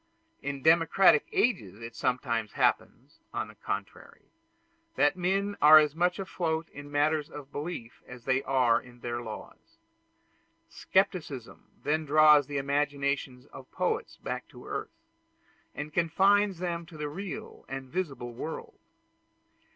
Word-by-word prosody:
In 140 -2 -4
democratic 165 +4 +5
ages 195 - 0
it 115 0 -8
sometimes 120 -4 -1
happens, 135 +5 -1 0.2
on - - -2
the - - -12
contrary, - - -7 0.6
that 145 - +3
men 195 +3 0
are 155 +1 +10
as 150 -2 +4
much 175 +2 +1
afloat 165 -4 -2
in 145 0 -10
matters 150 +1 +1
of 145 -1 -10
belief 145 -6 -6
as 125 -1 -11
they 130 0 +2
are 125 -4 +2
in 120 -1 -17
their 120 0 -3
laws. 120 - -10 0.9
Scepticism 155 - -1 0.2
then 155 +2 +1
draws 150 -1 +6
the 145 -1 -3
imagination 140 -1 -1
of - - -12
poets 450 0 -2
back - - -5
to - - -14
earth, 330 0 -6 0.7
and 150 0 -6
confines 195 +4 +3
them 170 -1 -3
to 160 - -12
the 150 -1 -3
real 180 +3 -7
and 135 0 -5
visible 135 -7 -4
world. 155 +7 -7
150 Hz, 135 wpm, -29 LUFS, 130-175 Hz, 0.9 s, are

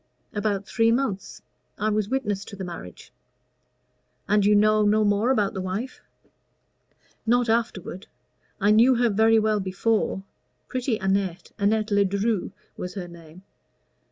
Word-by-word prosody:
"About 205 -2 -1
three 225 +2 +2
months. 230 -6 -2 0.3
I 215 +2 0
was 210 -1 0
witness 210 -7 -1
to - - -9
the 190 - -6
marriage." 170 - -9 1.1
"And 205 0 +3
you 210 +1 +4
know 215 +1 +4
no 210 +1 +3
more 205 +3 +2
about 210 -7 +1
the 190 - -4
wife?" 195 +8 -4 1.3
"Not 240 0 +3
afterward. 220 -5 -2 0.5
I 205 +2 +3
knew 235 +4 +5
her 240 -1 +2
very 220 +2 +4
well 215 -1 +2
before 195 +1 -1 0.4
pretty 255 -3 -1
Annette 190 -3 -1
Annette 215 +1 +1
Ledru 200 +1 +1 0.3
was 180 +1 -6
her 185 -3 -5
name. 170 +1 -14
210 Hz, 135 wpm, -25 LUFS, 195-225 Hz, 1.3 s, knew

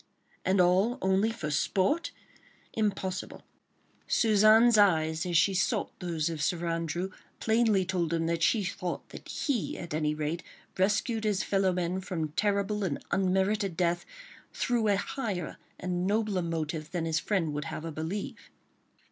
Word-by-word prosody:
And 190 +1 +2
all 190 +7 +3
only 190 +2 +2
for 165 -10 -4
sport? 195 - +1 0.6
Impossible! 195 -4 -2 0.6
Suzanne's 220 +2 +5
eyes 165 -5 +3
as 175 -2 +2
she 195 +4 +4
sought 190 0 0
those 170 -4 -1
of 165 -3 -3
Sir 170 +3 0
Andrew 165 +3 -2 0.3
plainly 220 -4 +3
told 175 -3 -1
him 165 -1 0
that 165 0 -1
she 210 +5 +3
thought 185 -1 -4
that - - -11
he 265 -9 -1
at 170 - -6
any 150 -1 0
rate 155 +3 -2 0.3
rescued 210 +4 +1
his 210 -2 +1
fellow 195 -1 +2
men 180 +1 -1
from 165 -4 -3
terrible 205 +4 0
and 160 -7 -2
unmerited 190 0 +1
death, 175 -1 +1 0.5
through 240 -3 0
a 205 - +4
higher 200 - -3 0.2
and 180 0 -1
nobler 210 -2 +1
motive 160 -2 -3
than 170 -2 -2
his 160 -1 +1
friend 175 -8 0
would 150 -1 -3
have 150 - -5
her 165 - -4
believe. 160 +7 -5
185 Hz, 150 wpm, -29 LUFS, 165-205 Hz, 0.6 s, Suzanne's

